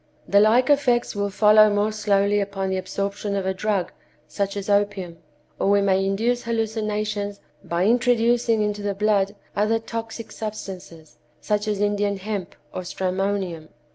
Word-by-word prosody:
The 200 - +5
like 225 +5 +4
effects 250 -6 +2
will 200 0 -1
follow 215 +1 +6
more 205 +1 +1
slowly 205 -1 +2
upon 195 -1 -2
the 190 - 0
absorption 200 +2 -3
of 195 -1 -2
a 190 - 0
drug, 195 -2 -1 0.4
such 200 +5 -3
as 200 - -5
opium; 200 -4 0 0.4
or - - +1
we 200 0 +5
may 195 -1 +2
induce 225 +5 0
hallucinations 215 -2 -2 0.2
by 170 +2 0
introducing 235 -1 +3
into 210 0 -2
the 205 -1 -2
blood 205 -1 +1 0.2
other 215 +2 +2
toxic 225 0 -6
substances, 190 -8 -8 0.2
such 210 +4 -1
as 210 -2 -1
Indian 205 -1 0
hemp 195 -2 -5 0.2
or - - -4
stramonium. 185 -2 -2
205 Hz, 150 wpm, -23 LUFS, 195-215 Hz, 0.4 s, follow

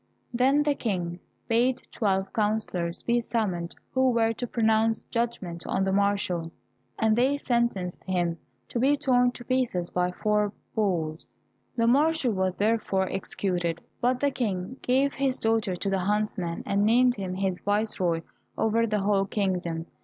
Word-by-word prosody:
Then 265 +4 +3
the 295 -1 +2
King 180 -9 -3 0.3
bade 245 +3 +2
twelve 195 -3 0
councillors 205 -5 -1
be 240 0 +2
summoned 195 -8 -2 0.2
who 260 0 +3
were 230 -2 +2
to 245 +2 -4
pronounce 225 -1 +2
judgment 230 -8 -3
on 190 - 0
the 190 - +1
marshal, 195 -4 +1 0.5
and 220 -1 +3
they 260 +4 +2
sentenced 235 -9 -1
him 175 -3 -1 0.3
to 240 - -2
be 280 +4 +3
torn 250 -3 +3
to 245 - -10
pieces 245 -10 0
by 180 0 +1
four 210 +2 0 0.2
bulls. 170 -7 -1 0.5
The 230 - +3
marshal 285 0 +3
was 190 -1 0
therefore 205 -3 +1
executed, 175 -3 -2 0.2
but 250 +1 +2
the 285 +1 +2
King 210 -1 -3
gave 270 +3 +2
his 270 -1 0
daughter 225 -4 +1
to 195 +3 -3
the 195 - +1
huntsman, 195 -3 -1
and 200 +1 +1
named 245 +3 +4
him 185 -2 -4
his 190 -1 -1
viceroy 205 -5 0 0.4
over 230 +1 +2
the 210 -2 0
whole 195 0 +2
kingdom. 180 -5 -2
210 Hz, 155 wpm, -27 LUFS, 185-240 Hz, 0.5 s, named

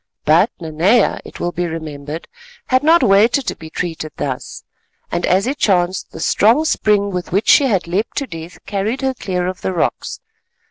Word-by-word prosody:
But 170 +8 +5
Nanea, 175 +8 +2
it - - -11
will 175 - -1
be 175 0 -2
remembered, 155 -1 -6 0.4
had 255 0 +2
not 325 +3 +5
waited 225 +7 +4
to - - -2
be 160 - -11
treated 160 -2 -4
thus, 130 -1 -5 0.5
and 175 - -1
as 190 +2 +2
it 280 +4 -2
chanced 185 -2 +1
the - - -9
strong 230 - +3
spring 205 -8 +1
with 180 -1 -4
which 200 +5 0
she 285 - +6
had 195 -8 0
leapt 195 +6 -2
to 280 - 0
death 165 -4 -9
carried 210 +6 -2
her 265 0 0
clear 180 -7 -3
of 185 0 -4
the 190 - -2
rocks. 170 - -2
185 Hz, 185 wpm, -18 LUFS, 165-225 Hz, 0.5 s, she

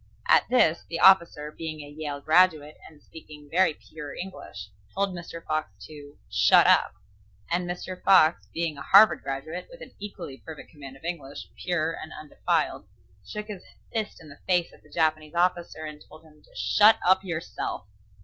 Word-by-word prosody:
At - - +4
this 170 -10 +3
the 165 - -4
officer, 170 -5 +5
being 155 -1 -6
a 145 - -10
Yale 145 -2 -5
graduate, 155 -2 +3
and 150 -2 -21
speaking 150 -2 -13
very 180 -3 +3
pure 150 -2 -10
English, 105 - -9 0.2
told 200 0 0
Mr. 170 -1 -9
Fox 155 0 -2 0.2
to 145 -2 -13
"shut - - +5
up," - - +4 0.6
and 175 +1 -1
Mr. 180 +1 -6
Fox 170 -4 +5
being 165 -3 -3
a - - -8
Harvard 205 +7 +6
graduate, 145 +6 -5
with - - -13
an - - -10
equally 180 -9 -8
perfect 160 -2 -10
command 135 -3 -11
of 135 - -24
English, 145 -5 -6
pure 170 -3 -1
and 160 - -8
undefiled, 155 -1 -2 0.4
shook 210 0 -6
his 210 -4 -8 0.3
fist 220 -2 -3
in 160 -3 -14
the 145 - -14
face 175 -2 +1
of - - -19
the - - -22
Japanese 155 -1 -1
officer 175 -2 0
and 150 -1 -9
told 155 +1 -15
him 150 -1 -21
to - - -24
"shut 215 +2 +5
up 190 +1 +4
yourself." 165 - -5
160 Hz, 175 wpm, -26 LUFS, 150-180 Hz, 0.6 s, Harvard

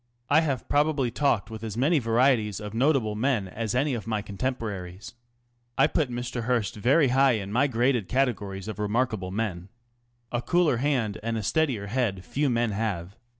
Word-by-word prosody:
I 155 +2 +6
have 140 -7 -2
probably 145 -4 +1
talked 120 -6 0
with 110 0 -7
as 110 -1 -5
many 150 +6 +3
varieties 115 -3 +2
of 105 -1 -7
notable 125 -3 +2
men 110 -2 0
as 110 +4 -3
any 135 +2 +1
of 115 -3 -5
my 110 -2 -1
contemporaries. 100 -2 -5 0.6
I 135 - +6
put 150 -2 0
Mr. 120 -1 -4
Hearst 120 -2 0
very 130 +6 +3
high 135 +1 +4
in 100 -3 -3
my 130 +6 +3
graded 120 -4 +1
categories 105 -7 -1
of 105 -2 -6
remarkable 105 -2 -1
men. 95 -3 -3 0.6
A 120 - -1
cooler 160 +1 +2
hand 125 -6 0
and 115 +1 -2
a 110 - -3
steadier 115 -1 0
head 100 -4 -1
few 145 0 0
men 120 -2 +1
have. 100 -3 -3
115 Hz, 175 wpm, -26 LUFS, 105-135 Hz, 0.6 s, I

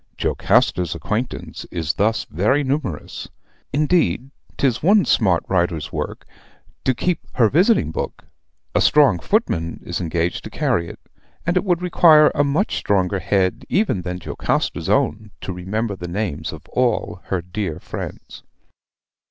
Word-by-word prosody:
Jocasta's 90 -2 +1
acquaintance 115 +4 -4
is 80 -3 -2
thus 110 +3 +1
very 110 - +1
numerous. 130 - -3 0.4
Indeed, 140 - +1 0.3
'tis 130 -4 +1
one 200 +5 +5
smart 95 -6 +3
writer's 85 -5 0
work - - -4 0.6
to 130 - +2
keep 180 +3 0
her 115 -4 +4
visiting 180 - +3
book - - -5 0.5
a - - +2
strong 140 - +5
footman 85 - 0
is 85 +1 -3
engaged 85 0 -1
to - - -6
carry 120 - 0
it; - - -10 0.5
and 170 +3 +1
it 180 - +2
would 180 -3 0
require 160 -4 +6
a 145 - +2
much 145 +9 0
stronger 95 -1 +1
head 95 +1 0
even 190 - +1
than 90 0 -4
Jocasta's 90 - -2
own 110 0 +1
to 95 - -4
remember 100 +4 -3
the 90 -1 -7
names 85 -4 -3
of 80 +1 -10
all 125 -6 0
her 95 - -1
dear 90 -2 -4
friends. - - -8
105 Hz, 145 wpm, -21 LUFS, 90-145 Hz, 0.6 s, require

